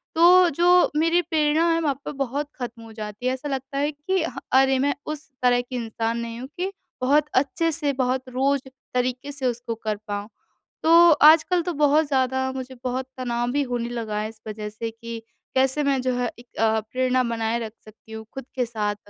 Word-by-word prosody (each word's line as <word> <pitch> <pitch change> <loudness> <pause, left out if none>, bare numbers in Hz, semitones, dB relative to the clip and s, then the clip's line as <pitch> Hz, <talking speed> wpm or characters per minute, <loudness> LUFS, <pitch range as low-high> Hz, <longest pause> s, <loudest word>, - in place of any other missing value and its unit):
तो 350 +2 +7
जो 350 +4 +4
मेरी 330 +3 +3
प्रेरणा 315 0 +2
है 330 - +1
वहाँ 285 -4 +1
पे - - -3
बहुत 280 +1 -2
खत्म 240 -2 -6
हो 225 - -12
जाती 215 +1 -7
है 255 - +2
ऐसा 275 +3 -5
लगता 270 0 -4
है 290 +2 +1
कि 315 +5 -1
ह 325 - -5 0.2
अरे, 265 0 +5
मैं 285 +2 +1
उस 305 -1 -6
तरह 245 0 +4
की 245 +1 -8
इंसान 230 -1 -2
नहीं 230 0 -5
हूँ 255 - -6
कि 375 +2 -2 0.3
बहुत 285 +4 +3
अच्छे 305 +5 +1
से, 290 -2 0
बहुत 255 0 0
रोज़ 270 +2 +1 0.3
तरीक़े 250 +3 -1
से 275 -2 -5
उसको 240 -1 -2
कर 215 -1 -3
पाऊँ। 205 0 -4 0.5
तो 335 +1 +7
आजकल 320 +4 +6
तो 355 - -2
बहुत 300 +1 +3
ज़्यादा 260 -1 +1
मुझे 260 0 -6
बहुत 255 +1 -2
तनाव 240 -1 -1
भी 285 +2 +1
होने 245 -2 -3
लगा 225 -3 -4
है 215 +1 -2
इस 220 -1 -15
वजह 210 0 -5
से 220 +2 -5
कि 230 0 -8 0.4
कैसे 265 +3 +3
मैं 275 -2 +2
जो 255 0 0
है 245 -2 -1
एक 240 0 -14
अ, 220 0 +3
प्रेरणा 255 +3 0
बनाए 230 -1 -1
रख 225 -2 -5
सकती 220 +1 -17
हूँ, 220 0 -7
खुद 270 -2 -7
के 250 - +1
साथ। 210 -3 -2
255 Hz, 205 wpm, -24 LUFS, 235-295 Hz, 0.5 s, तो